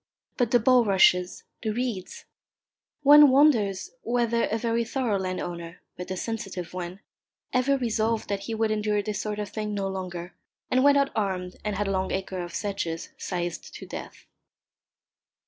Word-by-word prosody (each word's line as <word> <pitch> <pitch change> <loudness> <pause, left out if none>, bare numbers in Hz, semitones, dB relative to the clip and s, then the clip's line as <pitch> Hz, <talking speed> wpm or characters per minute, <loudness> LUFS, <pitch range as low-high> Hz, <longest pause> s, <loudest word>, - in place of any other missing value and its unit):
But 245 -4 +1
the 245 - +4
bulrushes, 200 -7 +4 0.2
the 220 - -2
reeds! 225 -4 -3 0.8
One 295 0 +9
wonders 260 - +3
whether 235 -1 +1
a 220 - -1
very 230 +1 0
thorough 230 -4 -1
landowner, 175 -2 -5 0.2
but 180 - -7
a 185 - -3
sensitive 195 -6 -5
one, 180 +1 -6 0.5
ever 265 +2 +3
resolved 225 -2 0
that 200 -1 -1
he 225 - -3
would 220 0 +1
endure 210 -1 0
this 210 0 -3
sort 210 -1 -3
of 210 -1 -4
thing 210 -1 -4
no 195 -1 -1
longer, 180 -2 -5 0.4
and 255 +1 +3
went 285 0 +6
out 280 0 +2
armed 185 -3 -2
and 210 -1 -2
had 205 +1 -1
a - - 0
long 190 -1 -1
acre 190 -1 -3
of 175 -1 -7
sedges 195 -5 -3
scythed 175 -1 -4
to - - -8
death. - - -9
210 Hz, 165 wpm, -26 LUFS, 185-235 Hz, 0.8 s, One